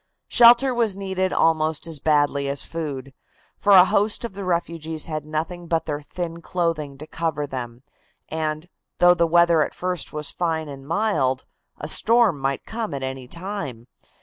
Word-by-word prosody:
Shelter 245 Hz, +2 st, +6 dB
was 230 Hz, -5 st, +1 dB
needed 190 Hz, -1 st, -2 dB
almost 160 Hz, -1 st, +1 dB
as 165 Hz, -3 st, -2 dB
badly 145 Hz, -2 st, +1 dB
as 140 Hz, 0 st, -3 dB
food, 140 Hz, -5 st, -5 dB, 0.4 s
for 205 Hz, -, +3 dB
a 185 Hz, -1 st, +9 dB
host 205 Hz, +4 st, +1 dB
of 230 Hz, -, -6 dB
the 200 Hz, +1 st, -6 dB
refugees 165 Hz, -3 st, -1 dB
had 155 Hz, -2 st, -5 dB
nothing 165 Hz, +3 st, -4 dB
but 165 Hz, -1 st, 0 dB
their 150 Hz, -1 st, -3 dB
thin 170 Hz, +3 st, -6 dB
clothing 165 Hz, -5 st, -2 dB
to 150 Hz, -, -8 dB
cover 155 Hz, -2 st, -2 dB
them, 125 Hz, -3 st, -7 dB, 0.4 s
and, 155 Hz, +1 st, -3 dB, 0.3 s
though 175 Hz, 0 st, +6 dB
the 170 Hz, -1 st, +2 dB
weather 170 Hz, -1 st, +4 dB
at -, -, -6 dB
first 180 Hz, -2 st, -3 dB
was 150 Hz, -1 st, -3 dB
fine 160 Hz, -3 st, -2 dB
and 140 Hz, -1 st, -10 dB
mild, 155 Hz, -9 st, 0 dB, 0.3 s
a -, -, -6 dB
storm 230 Hz, -9 st, +3 dB
might 135 Hz, 0 st, -2 dB
come 220 Hz, -7 st, -4 dB
at 135 Hz, -, -5 dB
any 130 Hz, -1 st, -5 dB
time. 170 Hz, -, -6 dB
160 Hz, 170 wpm, -23 LUFS, 145-180 Hz, 0.4 s, a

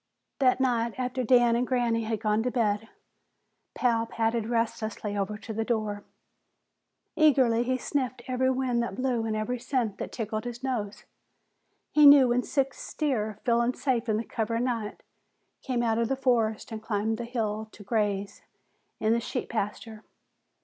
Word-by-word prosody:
That 255 Hz, -1 st, +4 dB
night, 235 Hz, -3 st, +1 dB
after 255 Hz, 0 st, -2 dB
Dan 240 Hz, -1 st, +5 dB
and 245 Hz, +1 st, 0 dB
Granny 235 Hz, -3 st, +1 dB
had 220 Hz, -1 st, -2 dB
gone 215 Hz, -1 st, +1 dB
to 250 Hz, -, 0 dB
bed, 225 Hz, -3 st, 0 dB, 0.9 s
Pal 230 Hz, -2 st, +1 dB
padded 225 Hz, -1 st, -1 dB
restlessly 220 Hz, -3 st, -2 dB
over 205 Hz, +1 st, -2 dB
to 220 Hz, +1 st, -7 dB
the 225 Hz, +1 st, -1 dB
door. 215 Hz, -3 st, -2 dB, 1.1 s
Eagerly 260 Hz, -7 st, +4 dB
he 255 Hz, +1 st, 0 dB
sniffed 255 Hz, -2 st, -2 dB
every 260 Hz, 0 st, +1 dB
wind 255 Hz, -2 st, 0 dB
that 215 Hz, -5 st, -3 dB
blew 245 Hz, -1 st, 0 dB
and 215 Hz, -, -1 dB
every 235 Hz, +3 st, -2 dB
scent 245 Hz, -5 st, -1 dB
that -, -, -5 dB
tickled 215 Hz, 0 st, -4 dB
his 240 Hz, +1 st, -6 dB
nose. 220 Hz, -6 st, -3 dB, 0.9 s
He 300 Hz, -1 st, +7 dB
knew 280 Hz, -3 st, +8 dB
when 245 Hz, +1 st, +2 dB
six 270 Hz, 0 st, -2 dB
deer, 220 Hz, -9 st, -1 dB
feeling 235 Hz, +1 st, +2 dB
safe 245 Hz, -4 st, -1 dB
in 215 Hz, -, +2 dB
the 225 Hz, -, -2 dB
cover 225 Hz, 0 st, -2 dB
of 230 Hz, -, 0 dB
night, 230 Hz, -4 st, -3 dB, 0.6 s
came 250 Hz, -3 st, -1 dB
out 225 Hz, -1 st, +1 dB
of 230 Hz, -, +1 dB
the 270 Hz, -, 0 dB
forest 230 Hz, -5 st, +1 dB
and 220 Hz, -1 st, -5 dB
climbed 220 Hz, 0 st, -1 dB
the 235 Hz, -, -3 dB
hill 220 Hz, -3 st, -3 dB
to 205 Hz, -, -13 dB
graze 205 Hz, -2 st, -1 dB, 0.6 s
in 220 Hz, +1 st, +2 dB
the 235 Hz, -, +2 dB
sheep 250 Hz, +2 st, -4 dB
pasture. 220 Hz, 0 st, -4 dB
230 Hz, 170 wpm, -28 LUFS, 220-250 Hz, 1.1 s, knew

